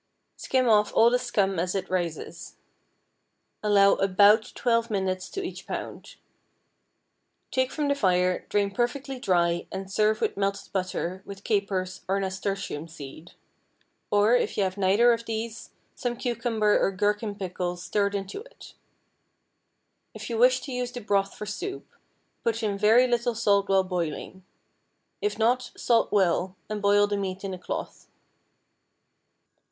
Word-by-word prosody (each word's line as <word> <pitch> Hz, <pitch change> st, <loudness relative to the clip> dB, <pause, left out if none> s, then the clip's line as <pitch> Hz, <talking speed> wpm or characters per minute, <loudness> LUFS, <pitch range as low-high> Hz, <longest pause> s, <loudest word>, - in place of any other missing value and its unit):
Skim 255 Hz, -1 st, 0 dB
off 210 Hz, -2 st, +4 dB
all 230 Hz, +1 st, +6 dB
the 250 Hz, -, +3 dB
scum 200 Hz, -7 st, 0 dB
as 180 Hz, +2 st, -1 dB
it 195 Hz, -1 st, -2 dB
rises. 170 Hz, -2 st, -4 dB, 1.1 s
Allow 200 Hz, -2 st, +5 dB
about 205 Hz, +3 st, +4 dB
twelve 230 Hz, -1 st, +1 dB
minutes 190 Hz, -3 st, -2 dB
to 390 Hz, -, -4 dB
each 360 Hz, -, -7 dB
pound. -, -, -6 dB, 1.4 s
Take 260 Hz, -1 st, +1 dB
from 300 Hz, -2 st, -1 dB
the 285 Hz, -, +3 dB
fire, 180 Hz, -7 st, +1 dB
drain 200 Hz, -1 st, +1 dB
perfectly 255 Hz, +4 st, -2 dB
dry, 175 Hz, -5 st, +1 dB
and 190 Hz, 0 st, -6 dB
serve 215 Hz, +2 st, +2 dB
with -, -, -1 dB
melted 200 Hz, 0 st, -2 dB
butter, 185 Hz, -1 st, -2 dB
with 200 Hz, 0 st, -10 dB
capers, 190 Hz, -3 st, -1 dB
or 195 Hz, +1 st, +1 dB
nasturtium 190 Hz, -4 st, -3 dB
seed; 155 Hz, +1 st, -11 dB, 0.8 s
or, 205 Hz, +3 st, +4 dB
if 245 Hz, -, 0 dB
you 205 Hz, -, +3 dB
have 185 Hz, -1 st, -1 dB
neither 205 Hz, +5 st, +4 dB
of 230 Hz, 0 st, -4 dB
these, 225 Hz, 0 st, -5 dB, 0.2 s
some 240 Hz, -2 st, -3 dB
cucumber 230 Hz, -3 st, +1 dB
or -, -, +3 dB
gherkin 205 Hz, +2 st, -1 dB
pickle 180 Hz, -2 st, -3 dB
stirred 200 Hz, +3 st, -1 dB
into 195 Hz, -, -4 dB
it. -, -, -14 dB, 1.4 s
If -, -, -7 dB
you 225 Hz, -, -1 dB
wish 255 Hz, +1 st, +5 dB
to 270 Hz, -, -7 dB
use 250 Hz, 0 st, -2 dB
the 245 Hz, -, -7 dB
broth 200 Hz, -2 st, 0 dB
for 210 Hz, -, -6 dB
soup, 295 Hz, -, -5 dB, 0.6 s
put 230 Hz, 0 st, -1 dB
in 205 Hz, -2 st, 0 dB
very 220 Hz, +5 st, +5 dB
little 240 Hz, -1 st, 0 dB
salt 200 Hz, -3 st, +2 dB
while 195 Hz, -1 st, +4 dB
boiling; 180 Hz, 0 st, -4 dB, 0.8 s
if 420 Hz, -, -1 dB
not, 245 Hz, +3 st, +1 dB
salt 235 Hz, -2 st, +2 dB
well, 185 Hz, -2 st, +1 dB
and 210 Hz, -1 st, -3 dB
boil 205 Hz, 0 st, +4 dB
the 205 Hz, 0 st, -2 dB
meat 195 Hz, -1 st, -4 dB
in 195 Hz, -1 st, -4 dB
a 185 Hz, -, -7 dB
cloth. -, -, -6 dB
205 Hz, 150 wpm, -26 LUFS, 190-230 Hz, 1.4 s, all